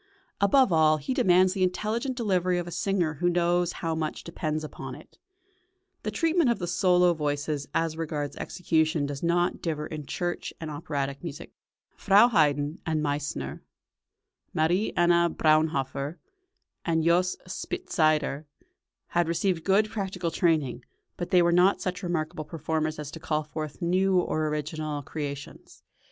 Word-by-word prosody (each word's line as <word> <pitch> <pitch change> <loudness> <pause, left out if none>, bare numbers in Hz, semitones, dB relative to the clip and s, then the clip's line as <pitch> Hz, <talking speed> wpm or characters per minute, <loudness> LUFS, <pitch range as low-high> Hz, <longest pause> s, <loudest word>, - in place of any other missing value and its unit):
Above 200 +1 +4
all, 155 -1 +5
he 155 - -3
demands 185 -7 +4
the 195 - -3
intelligent 220 +8 -1
delivery 185 -6 +1
of 175 - -2
a 175 - -7
singer 180 -4 0
who 175 - +3
knows 175 0 +2
how 165 - +1
much 160 -1 -3
depends 155 -2 -3
upon 135 -4 -7
it. 150 - -16 0.8
The - - -3
treatment 325 - +2
of 235 - +2
the 175 - -3
solo 180 0 +3
voices 145 -1 -2
as 165 -1 0
regards 150 -3 -3
execution 160 -3 0
does 140 -1 -5
not 175 +1 +1
differ 155 -3 -2
in 150 -3 -7
church 175 +3 -3
and 160 -2 -5
operatic 140 -2 -3
music. 155 -4 -7 0.4
Frau 205 +4 +5
Haydn 150 - +2
and 155 -2 -1
Meissner, 145 - -3 0.9
Marie 175 +7 +2
Anna 170 0 +4
Braunhofer 155 -2 +1 0.7
and 165 -2 +1
Jos. 180 +2 +3
Spitzeder, 155 - 0 0.6
had 175 -1 +1
received 170 0 0
good 200 +4 +3
practical 190 -5 -3
training, 155 -8 +1 0.3
but 175 - -5
they 180 -1 +5
were 170 - +3
not 180 +3 +4
such 185 +1 -3
remarkable 160 -4 -2
performers 155 0 -2
as 150 -1 -6
to 165 - -8
call 155 -1 -1
forth 155 +2 -6
new 185 +2 +3
or 155 -3 0
original 150 0 -3
creations. 140 -1 -7
165 Hz, 145 wpm, -27 LUFS, 155-180 Hz, 0.9 s, all